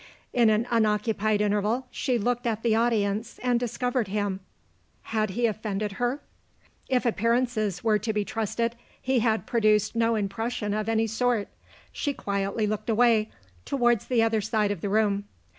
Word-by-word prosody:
In 235 -3 +4
an 215 +2 +2
unoccupied 215 -1 +1
interval, 210 +4 +1
she 255 -3 0
looked 245 +2 -1
at 225 -1 -2
the 230 -2 +3
audience 220 -2 0
and 245 -1 +2
discovered 245 -1 -1
him. 200 -1 -2 0.6
Had 215 -2 -1
he 235 +5 0
offended 210 -2 -2
her? 245 +4 0 0.7
If 255 -1 +1
appearances 230 -4 0
were 215 -2 +3
to 220 +1 -2
be 210 -1 -1
trusted, 230 +1 -2 0.2
he 260 -1 +1
had 220 -1 +1
produced 215 -2 +2
no 230 0 +2
impression 210 +1 -2
of 215 +1 -2
any 225 0 +2
sort. 225 -1 0 0.4
She 285 - -2
quietly 200 +2 -1
looked 215 +2 -3
away, 225 -1 +3 0.3
towards 240 -5 +1
the 240 -3 +3
other 225 -1 +1
side 215 -1 0
of 195 -5 -4
the 200 - -2
room. 205 -1 +1
220 Hz, 160 wpm, -26 LUFS, 210-235 Hz, 0.7 s, In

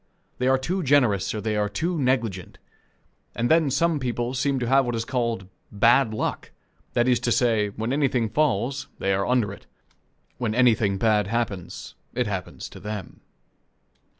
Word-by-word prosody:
They 125 - +1
are 135 0 +4
too 175 +9 -2
generous, 125 - +3
or 110 - -4
they 110 0 -1
are 105 0 0
too 165 - -2
negligent; 115 -9 -1 0.8
and 120 +3 0
then 160 -3 +4
some 165 +3 +1
people 120 -1 -2
seem 135 +1 0
to 125 - -1
have 135 +2 +4
what 120 -2 -2
is 115 0 -2
called 115 -6 -1 0.3
"bad 115 +3 +4
luck" 110 - -3 0.4
that 120 +1 +2
is 125 -2 +3
to 120 0 -1
say, 115 -4 +2
when 110 +5 -3
anything 135 -5 +1
falls, 135 +1 0
they 95 - 0
are 95 0 0
under 120 -5 +1
it; - - -14 0.7
when 115 -3 -1
anything 110 -5 +3
bad 105 -1 +2
happens, 105 -5 -3 0.2
it 125 0 +1
happens 95 -4 -5
to - - -12
them. 105 -1 -7
120 Hz, 170 wpm, -24 LUFS, 105-130 Hz, 0.8 s, are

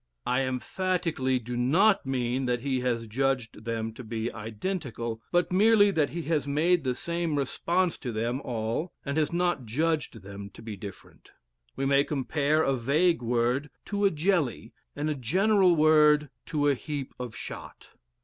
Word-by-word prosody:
I 125 +2 +1
emphatically 155 0 -1
do 120 0 -5
not 170 - +3
mean 130 0 -1
that 120 -1 0
he 130 -1 0
has 120 -2 -1
judged 120 -2 -1
them 115 -1 -2
to 125 - -9
be 115 0 -3
identical, 115 - -4
but 175 0 +2
merely 205 +1 +5
that 155 -6 +1
he 170 +1 -5
has 155 -2 0
made 165 +4 +2
the 130 -2 0
same 170 0 -2
response 170 +6 0
to 125 - -4
them 115 +4 -2
all 115 +8 -3
and 140 0 -2
has 155 -1 +1
not 175 -6 0
judged 150 -3 -1
them 100 0 -8
to - - -12
be 110 -2 -6
different. 100 -1 -11 0.5
We 135 - -2
may 140 0 +4
compare 150 +2 +1
a 135 - +2
vague 150 +7 +2
word 120 +4 0 0.2
to 205 0 0
a - - +6
jelly 155 - 0 0.2
and 145 +1 -2
a 155 - +1
general 185 - +3
word 150 -2 +5 0.2
to 145 -2 +1
a 145 - +5
heap 140 0 -5
of 125 -2 -6
shot. - - -9
140 Hz, 170 wpm, -28 LUFS, 120-165 Hz, 0.5 s, a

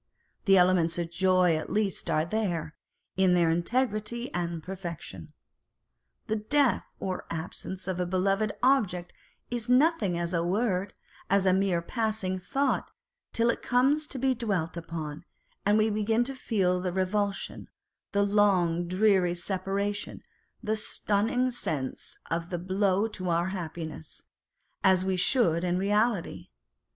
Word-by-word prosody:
The 195 -2 +6
elements 180 -2 +3
of 170 -1 -3
joy 185 -1 +3
at 155 - -4
least 210 -3 -1
are 155 +1 +2
there, 175 -6 -2 0.4
in 185 -2 +4
their 170 -2 +3
integrity 235 +5 -1
and 170 -2 -3
perfection. 170 - -7 0.9
The 220 - -1
death 270 +4 +2
or 185 -1 -4
absence 180 +3 -5
of 185 -1 -2
a 180 - 0
beloved 195 +3 +1
object 195 -10 +2 0.4
is 240 -1 -3
nothing 250 - +3
as 170 +1 -2
a 170 -1 +1
word, 195 +1 0 0.4
as 195 0 +3
a 185 - +4
mere 190 -3 +1
passing 215 -3 -2
thought, 275 +9 0 0.4
till 230 +1 +3
it - - -6
comes 280 +5 +2
to 275 - -6
be 260 +1 +2
dwelt 195 -9 -2
upon, 160 -2 -6 0.4
and 205 +1 +5
we 215 0 +3
begin 220 +3 +1
to 270 +3 -4
feel 185 -8 0
the 180 -1 -1
revulsion, 195 +2 -2 0.4
the 200 0 +2
long 185 -4 +2
dreary 185 -1 +3
separa 195 +3 -1
tion, 205 - -7 0.4
the 215 0 0
stunning 220 +4 0
sense 150 - -4
of 165 +1 -2
the 175 - -2
blow 190 +3 +1
to 185 -4 -4
our 170 +2 +1
happiness, 160 - -6 0.6
as 190 -1 +4
we 190 -1 +1
should 180 -4 +3
in 180 0 +1
reality. 205 0 0
190 Hz, 140 wpm, -28 LUFS, 175-215 Hz, 0.9 s, The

